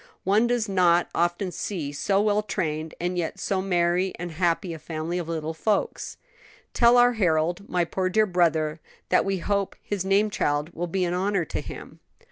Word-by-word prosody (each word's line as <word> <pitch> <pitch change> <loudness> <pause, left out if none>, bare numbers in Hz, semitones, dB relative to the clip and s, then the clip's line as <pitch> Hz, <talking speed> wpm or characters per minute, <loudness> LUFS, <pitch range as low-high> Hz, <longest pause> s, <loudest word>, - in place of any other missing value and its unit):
One 210 +5 +3
does 240 -2 0
not 175 -3 +3
often 175 +2 0
see 170 -7 -4
so 195 +7 +1
well 210 0 +2
trained 160 -6 -3
and 180 +1 -1
yet 165 - -3
so 190 -1 -1
merry 180 0 +1
and 175 0 -5
happy 170 +1 0
a 160 - -8
family 165 +3 -4
of 170 -2 -5
little 160 -1 -3
folks. 205 +6 -1 0.6
"Tell 235 0 +5
our 245 0 +6
Harold 175 -1 0
my 175 -1 +1
poor 185 +2 -1
dear 215 +3 +3
brother 165 -4 +1 0.3
that - - +3
we 195 -1 0
hope 200 +2 -1
his 200 -3 -3
name 200 +2 +2
child 150 -1 -1
will 175 +2 -3
be 185 +2 0
an 175 - -1
honor 190 -1 0
to - - -4
him." - - -10
180 Hz, 185 wpm, -25 LUFS, 165-200 Hz, 0.6 s, our